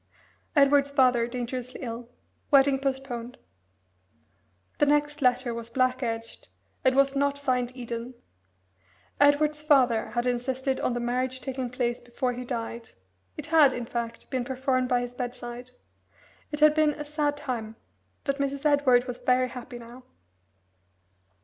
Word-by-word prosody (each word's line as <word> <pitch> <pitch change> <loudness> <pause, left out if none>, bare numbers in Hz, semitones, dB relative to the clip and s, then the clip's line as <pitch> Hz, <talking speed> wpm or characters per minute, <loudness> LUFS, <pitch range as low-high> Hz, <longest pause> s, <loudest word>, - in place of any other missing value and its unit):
'Edward's 280 0 +5
father 250 -4 +3
dangerously 250 +1 -5
ill. 235 0 -6 0.4
Wedding 275 -1 +5
postponed.'" 265 -3 -4 1.4
The 295 - +4
next 295 0 +1
letter 250 -1 +2
was 230 0 -6
black 255 +1 +1
edged, 230 -2 -5 0.3
and 260 0 +3
was 275 0 +3
not 280 0 +1
signed 250 -3 0
"Eden." 240 0 -6 1.0
Edward's 295 +1 +4
father 260 -7 +3
had 240 +1 0
insisted 260 +2 -1
on - - 0
the - - -1
marriage 255 +2 -1
taking 260 -1 -4
place 240 -1 -2
before 245 +1 -2
he 250 +1 -6
died 235 -2 -5 0.5
it - - -5
had, 295 -5 +7
in 245 - -4
fact, 230 0 -5
been 260 -2 0
performed 255 0 0
by 245 -1 +2
his 245 0 -5
bedside. 245 0 -6 0.8
It 295 0 -4
had 305 0 +7
been 305 -1 +2
a 295 - -6
sad 295 -1 -1
time, 225 -6 -4 0.5
but 275 -1 -1
Mrs. 280 +1 -2
Edward 280 -4 +4
was 245 -1 -6
very 255 0 +2
happy 245 0 -8
now. 240 +2 -12
255 Hz, 145 wpm, -27 LUFS, 240-280 Hz, 1.4 s, had